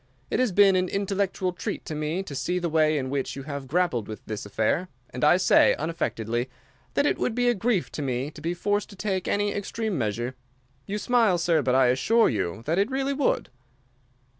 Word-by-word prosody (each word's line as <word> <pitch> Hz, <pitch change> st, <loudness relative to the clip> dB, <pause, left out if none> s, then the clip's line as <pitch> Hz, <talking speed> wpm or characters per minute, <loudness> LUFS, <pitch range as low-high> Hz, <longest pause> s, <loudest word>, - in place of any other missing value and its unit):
It -, -, +1 dB
has 255 Hz, -4 st, +2 dB
been 195 Hz, 0 st, +5 dB
an 185 Hz, -1 st, +1 dB
intellectual 195 Hz, -2 st, -1 dB
treat 175 Hz, -, -5 dB
to -, -, -5 dB
me 155 Hz, +5 st, -2 dB
to 150 Hz, -, -8 dB
see 140 Hz, +7 st, -1 dB
the 175 Hz, -1 st, -1 dB
way 155 Hz, -1 st, +3 dB
in 130 Hz, -2 st, -3 dB
which 140 Hz, -2 st, -2 dB
you 135 Hz, -, -6 dB
have 140 Hz, -1 st, -6 dB
grappled 145 Hz, -, 0 dB
with 110 Hz, -, -8 dB
this 105 Hz, -1 st, -5 dB
affair, 110 Hz, -, 0 dB, 0.2 s
and 125 Hz, 0 st, -5 dB
I 175 Hz, -, +6 dB
say, 185 Hz, -, +5 dB
unaffectedly, 120 Hz, -6 st, -2 dB, 0.5 s
that 285 Hz, -, +3 dB
it -, -, +1 dB
would 235 Hz, -, -1 dB
be 245 Hz, 0 st, +1 dB
a -, -, +4 dB
grief 220 Hz, -3 st, 0 dB
to -, -, -5 dB
me 130 Hz, +1 st, -2 dB
to -, -, -12 dB
be 170 Hz, +2 st, -2 dB
forced 205 Hz, +3 st, -1 dB
to 200 Hz, -, -12 dB
take 190 Hz, -2 st, -2 dB
any 205 Hz, 0 st, +1 dB
extreme 205 Hz, -3 st, -3 dB
measure. 120 Hz, +3 st, -2 dB, 0.5 s
You 205 Hz, +1 st, -2 dB
smile, 225 Hz, -4 st, +3 dB
sir, 170 Hz, -2 st, +2 dB
but 130 Hz, -1 st, +1 dB
I 130 Hz, 0 st, +5 dB
assure 225 Hz, -, +3 dB
you 100 Hz, -1 st, -2 dB
that 165 Hz, +5 st, +1 dB
it 200 Hz, +4 st, +2 dB
really 270 Hz, +1 st, -1 dB
would. 275 Hz, -1 st, 0 dB
175 Hz, 215 wpm, -26 LUFS, 130-205 Hz, 0.5 s, I